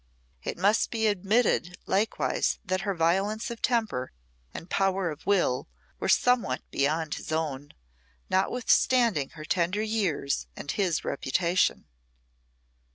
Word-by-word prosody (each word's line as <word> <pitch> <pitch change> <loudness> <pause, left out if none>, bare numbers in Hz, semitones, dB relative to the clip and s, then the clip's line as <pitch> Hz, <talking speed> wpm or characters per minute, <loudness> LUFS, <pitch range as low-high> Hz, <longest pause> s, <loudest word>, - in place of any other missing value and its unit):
It - - -4
must 200 +5 +2
be 225 -1 -1
admitted 205 -3 +1
likewise 205 +3 0
that 185 +1 -1
her 200 -1 -2
violence 195 +8 +1
of 235 - -7
temper 220 - 0 0.4
and 165 - -8
power 195 -2 +1
of 150 - -11
will 180 -11 +2 0.3
were - - -2
somewhat 235 - +2
beyond 150 +3 0
his - - -6
own, 145 -3 -3 0.5
notwithstanding 230 - +2
her 155 - -7
tender 180 +5 0
years 180 - -1
and 145 - -4
his 185 -6 0
reputation. 170 +7 0
185 Hz, 120 wpm, -27 LUFS, 155-215 Hz, 0.5 s, must